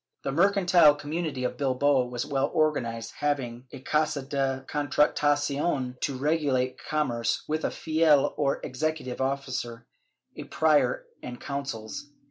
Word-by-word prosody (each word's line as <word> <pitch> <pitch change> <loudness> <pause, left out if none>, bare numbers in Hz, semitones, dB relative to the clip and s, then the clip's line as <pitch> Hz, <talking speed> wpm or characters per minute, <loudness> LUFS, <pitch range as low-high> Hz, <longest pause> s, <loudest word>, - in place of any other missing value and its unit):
The 135 - -2
mercantile 175 -2 +5
community 145 -2 -3
of 125 - -2
Bilbao 135 -1 +2
was 125 +1 -4
well 140 0 0
organized, 115 -7 0
having 130 -4 -2
a - - -8
Casa 150 0 0
de 135 -1 -2
Contratacion 145 -1 +1
to 135 -3 -1
regulate 140 -3 0
com 150 -2 0
merce, 115 -1 -1
with 155 +1 -2
a - - +1
Fiel 155 -3 +2
or 140 -2 0
executive 145 -2 -3
officer, 130 -3 -3 0.5
a - - -7
Prior 160 - +2 0.2
and 120 -1 -7
Consuls. 140 0 -5
140 Hz, 130 wpm, -27 LUFS, 130-150 Hz, 0.5 s, mercantile